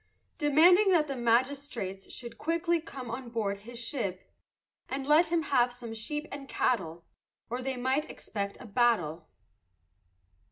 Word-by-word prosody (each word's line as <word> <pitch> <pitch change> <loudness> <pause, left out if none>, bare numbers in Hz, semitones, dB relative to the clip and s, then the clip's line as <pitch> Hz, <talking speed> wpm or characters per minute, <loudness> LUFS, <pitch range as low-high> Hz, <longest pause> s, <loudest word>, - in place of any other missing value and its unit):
Demanding 340 +7 +6
that 310 -3 +4
the 275 - -3
magistrates 240 -5 0
Should 235 -2 -8
quickly 335 +1 +1
come 255 -6 -8
on 245 +1 -5
board 210 -4 -1
his 235 +4 -10
ship, 230 -6 -4 0.6
And 270 0 -3
let 305 +4 +5
him 330 0 +1
have 250 -4 +3
some 240 -2 -8
sheep 295 +7 -3
and 275 -1 -7
cattle, 170 -8 0 0.5
Or 245 +1 -2
they 265 0 -3
might 260 +5 0
expect 200 -2 -5
a - - -10
battle. 200 -9 +1
250 Hz, 145 wpm, -30 LUFS, 225-295 Hz, 0.6 s, Demanding